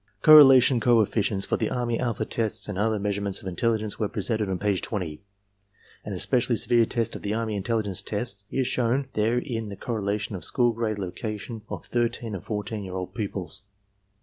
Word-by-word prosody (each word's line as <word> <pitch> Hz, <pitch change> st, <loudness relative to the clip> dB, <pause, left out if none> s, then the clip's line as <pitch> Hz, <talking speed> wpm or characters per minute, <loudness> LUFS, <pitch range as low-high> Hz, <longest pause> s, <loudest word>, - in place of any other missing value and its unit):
Correlation 135 Hz, -4 st, +8 dB
coefficients 110 Hz, -4 st, +2 dB
for -, -, 0 dB
the -, -, -1 dB
army 120 Hz, -2 st, -1 dB
alpha 120 Hz, -4 st, -1 dB
test 110 Hz, -2 st, -2 dB
and 105 Hz, -, -4 dB
other 110 Hz, +2 st, +1 dB
measurements 100 Hz, -1 st, -2 dB
of -, -, -9 dB
intelligence 110 Hz, +3 st, -1 dB
were 105 Hz, -, +1 dB
presented 105 Hz, 0 st, -1 dB
on 95 Hz, -, -1 dB
page 100 Hz, -1 st, 0 dB
20. 90 Hz, -7 st, -4 dB, 0.8 s
An 105 Hz, -, -5 dB
especially 120 Hz, +5 st, +1 dB
severe 115 Hz, 0 st, +3 dB
test 115 Hz, -1 st, -2 dB
of -, -, -7 dB
the 105 Hz, +1 st, -2 dB
army 110 Hz, -2 st, -2 dB
intelligence 105 Hz, -1 st, -1 dB
tests 105 Hz, -2 st, -2 dB
is 130 Hz, -1 st, 0 dB
shown 130 Hz, +3 st, 0 dB
there 110 Hz, +3 st, +1 dB
in 115 Hz, -4 st, -3 dB
the 100 Hz, -, -6 dB
correlation 105 Hz, -2 st, -2 dB
of 90 Hz, -, -6 dB
school 120 Hz, +6 st, +2 dB
grade 110 Hz, -2 st, -2 dB
location 105 Hz, +3 st, -5 dB
of -, -, -6 dB
thirteen 120 Hz, -2 st, -1 dB
and 95 Hz, -, -5 dB
fourteen 105 Hz, 0 st, -4 dB
year 95 Hz, -1 st, -7 dB
old 95 Hz, 0 st, -5 dB
pupils. 100 Hz, -2 st, -1 dB
110 Hz, 180 wpm, -26 LUFS, 100-120 Hz, 0.8 s, Correlation